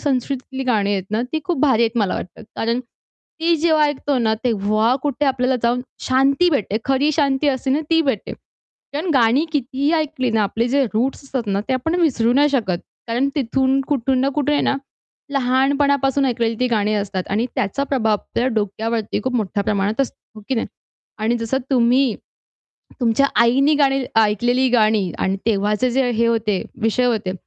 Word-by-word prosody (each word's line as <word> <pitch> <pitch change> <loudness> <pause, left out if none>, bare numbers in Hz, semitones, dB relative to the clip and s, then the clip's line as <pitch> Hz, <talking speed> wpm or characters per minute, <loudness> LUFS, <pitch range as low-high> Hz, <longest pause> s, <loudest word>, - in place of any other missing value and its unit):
संस्कृतीतली 265 -1 -2
गाणी 210 -5 +1
आहेत 195 -2 -2
ना, 220 +2 0
ती 315 - +1
खूप 350 -6 -1
भारी 260 -6 +3
आहेत 230 +1 0
मला 200 -4 +1
वाटतं. 185 - -7
कारण 230 +2 0
ती 325 +6 -5
जेव्हा 315 -1 +3
ऐकतो 290 -1 -1
ना, 220 -2 +1
तेव्हा 215 +1 +1
कुठे 290 0 -1
आपल्याला 255 -1 +1
जाऊन 240 +1 +1 0.3
शांती 270 +6 +3
भेटते. 215 - 0
खरी 270 +2 +2
शांती 280 -1 +1
असते 265 -1 -1
ना, 285 +4 +2
ती 325 - +4
भेटते. 265 -9 -2 0.6
कारण 315 +5 -2
गाणी 250 +4 +3
कितीही 275 +1 -1
ऐकली 285 -6 0
ना, 220 -1 +2
आपले 225 +4 -1
जे 275 +1 +2
रूट्स 255 +7 -1
असतात 260 -4 -4
ना, 195 - 0
ते - - +1
आपण 320 +7 -1
विसरू 240 -8 +2
नाही 285 +3 +4
शकत 220 -11 0 0.3
कारण 245 +4 +1
तिथून 265 +1 +1
कुठून 265 -2 +1
ना 270 - +2
कुठे 295 0 0
आहे 290 - +2
ना, - - +1 0.6
लहानपणापासून 275 +1 +2
ऐकलेली 230 -2 0
ती 250 - +3
गाणी 215 -2 +1
असतात 200 -3 -2
आणि 220 +5 0
त्याचा 240 +8 -1
प्रभाव 230 -6 0
आपल्या 235 +4 -2
डोक्यावरती 220 +1 -2
खूप 260 -1 -1
मोठ्या 205 -2 -1
प्रमाणात 205 +4 0
असतो, 270 - -1 0.2
हो 215 - -11
की 265 - 0
नाही? 225 - -1 0.5
आणि 225 +3 0
जसं 230 +4 -1
तुम्ही 250 -1 +3 0.9
तुमच्या 240 +3 +3
आईनी 270 +6 +4
गाणी 275 -2 +2
ऐकलेली 240 +4 +2
गाणी 215 -5 +2
आणि 190 +1 0
तेव्हाचे 210 +3 +1
जे 255 0 +1
हे 235 0 +1
होते 220 -4 0 0.2
विषय 225 +3 +1
होते, 220 -6 0
250 Hz, 175 wpm, -20 LUFS, 220-275 Hz, 0.9 s, ती